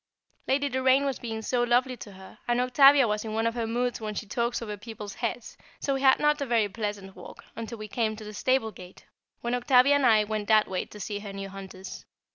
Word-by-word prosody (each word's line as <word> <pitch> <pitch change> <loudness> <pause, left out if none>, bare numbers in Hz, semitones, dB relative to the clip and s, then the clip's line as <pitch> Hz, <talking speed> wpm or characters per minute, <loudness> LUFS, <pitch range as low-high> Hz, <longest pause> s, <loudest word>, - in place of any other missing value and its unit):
Lady 280 +2 +1
Doraine 260 +1 +2
was 275 -3 -2
being 225 -2 -5
so 245 +2 0
lovely 245 +2 +2
to 205 -4 -11
her, 190 0 -14
and 240 0 +1
Octavia 275 +1 +6
was 210 0 -1
in 220 -1 -5
one 225 +1 0
of 230 - +1
her 230 -1 -2
moods 245 +1 -1
when 215 -1 -4
she 215 - -4
talks 235 +3 -1
over 210 -3 -5
people's 210 -1 -8
heads, 235 +2 -5 0.2
so 275 - -1
we 270 - -2
had 265 -1 +6
not 295 0 +2
a - - 0
very 230 -3 +2
pleasant 205 -2 -5
walk, 180 - -12
until 230 +1 -6
we 215 0 -7
came 220 0 -1
to 215 - -10
the 210 0 -8
stable 255 0 +1
gate, 180 -2 -14 0.4
when 240 +1 -2
Octavia 250 +2 +4
and 285 -3 +3
I 215 -2 +5
went 210 -1 -3
that 215 -1 +4
way 185 -1 -3
to 210 - -13
see 205 +1 -4
her 205 -1 -8
new 195 0 -6
hunters. 190 -1 -9
225 Hz, 240 wpm, -27 LUFS, 210-250 Hz, 0.4 s, Octavia